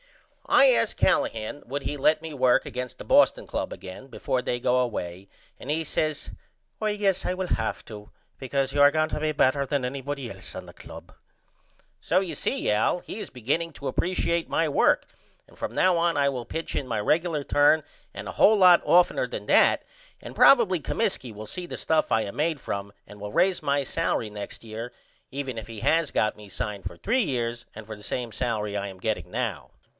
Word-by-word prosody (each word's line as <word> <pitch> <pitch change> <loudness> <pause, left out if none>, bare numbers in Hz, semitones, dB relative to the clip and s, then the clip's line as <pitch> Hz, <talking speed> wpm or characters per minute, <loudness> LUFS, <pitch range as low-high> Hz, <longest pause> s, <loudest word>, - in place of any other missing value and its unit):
I - - +6
asked - - +1
Callahan 110 +6 0
would 140 +3 -4
he 145 - -3
let 155 +2 +2
me 160 -1 -6
work 130 -2 +3
against 125 0 -6
the - - -9
Boston - - +4
Club - - -3
again 95 +8 -9
before 130 -1 -2
they 120 -1 -2
go 125 +1 +2
away 95 -6 -3 0.3
and 135 - -9
he 160 +2 0
says 155 0 -2 0.5
I 215 -1 0
guess 195 -3 +1
I 180 - -1
will 185 0 -3
have 110 - -3
to 105 -2 -10 0.3
because 135 0 -1
you 145 - +2
are 145 0 +8
going 155 0 0
better 140 0 +2
than 140 -1 -1
anybody 135 0 -4
else 95 -1 -8
on - - -7
the - - -13
club. - - -12 0.9
So 180 - +2
you 185 -4 -3
see - - -1
Al 110 +11 +2
he 210 - -8
is - - -6
beginning 145 +8 -2
to 140 - -7
appresiate 170 -2 -1
my 165 - +1
work 145 - +3 0.4
and - - -20
from - - -4
now 185 -1 +3
on 170 -1 +1
I 140 -1 +3
will 125 -3 -4
pitch 160 +7 -5
in 135 - -2
my 115 -3 -1
regular 155 +6 +1
turn 145 +2 +4 0.3
and - - -7
a - - -5
hole 215 +1 +5
lot 180 -3 +7
offtener 180 0 +3
then - - -6
that - - +4 0.4
and - - -10
probily 220 -10 +6
Comiskey 185 - -2
will 105 +1 -8
see 180 - -5
the - - -6
stuff 160 -1 +1
I 110 - +3
am 100 - -7
made 155 0 0
from 100 -4 -5 0.2
and 105 0 -13
will 105 0 -5
raise 185 - +2
my 140 0 +1
salery 130 -6 -1
next 105 +1 -8
year 115 +2 -6 0.4
even 135 -3 -5
if 110 - -10
he 115 -2 -8
has 165 -2 +2
got 105 - +1
me 105 -1 -13
signed 105 +1 -5
for - - -6
3 245 +5 0
years 120 - -2
and 110 0 -9
for 110 0 -7
the 105 - -14
same 120 0 -3
salery 105 -3 -2
I 100 0 -3
am 95 - -11
getting 110 +3 -3
now. - - -3
140 Hz, 205 wpm, -26 LUFS, 110-165 Hz, 0.9 s, are